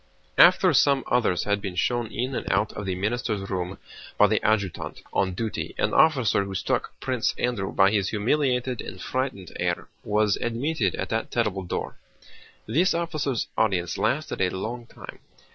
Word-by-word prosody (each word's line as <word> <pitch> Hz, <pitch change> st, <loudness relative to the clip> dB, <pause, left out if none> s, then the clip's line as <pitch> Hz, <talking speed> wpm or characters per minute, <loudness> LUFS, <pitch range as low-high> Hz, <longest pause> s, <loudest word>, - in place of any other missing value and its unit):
After -, -, +7 dB
some 140 Hz, -2 st, +4 dB
others 115 Hz, -7 st, +2 dB
had 105 Hz, 0 st, 0 dB
been 95 Hz, -3 st, -5 dB
shown 120 Hz, +5 st, 0 dB
in 125 Hz, +5 st, -3 dB
and -, -, -2 dB
out 105 Hz, -, +1 dB
of 105 Hz, -1 st, -6 dB
the 95 Hz, -, -1 dB
minister's 105 Hz, 0 st, -2 dB
room 90 Hz, 0 st, -3 dB, 0.4 s
by 105 Hz, -, +7 dB
the 105 Hz, +1 st, +1 dB
adjutant 100 Hz, -4 st, -1 dB
on 95 Hz, -2 st, +1 dB
duty, 110 Hz, +2 st, -4 dB
an -, -, 0 dB
officer 130 Hz, -10 st, +4 dB
who 100 Hz, -1 st, -6 dB
struck -, -, -2 dB
Prince 130 Hz, -3 st, -1 dB
Andrew 115 Hz, -6 st, -1 dB
by 95 Hz, 0 st, +4 dB
his 100 Hz, -3 st, +1 dB
humiliated 125 Hz, +2 st, 0 dB
and 90 Hz, -, -8 dB
frightened 115 Hz, -6 st, -3 dB
air -, -, -1 dB, 0.2 s
was 105 Hz, -1 st, +2 dB
admitted 130 Hz, +7 st, -1 dB
at -, -, -4 dB
that 110 Hz, 0 st, -1 dB
terrible 105 Hz, -5 st, 0 dB
door. 90 Hz, -, -4 dB, 0.7 s
This 165 Hz, -, +2 dB
officer's 155 Hz, -7 st, -1 dB
audience 90 Hz, -6 st, +1 dB
lasted 150 Hz, -4 st, -1 dB
a 90 Hz, -, +3 dB
long 115 Hz, +6 st, -5 dB
time. -, -, -11 dB
110 Hz, 165 wpm, -25 LUFS, 95-125 Hz, 0.7 s, After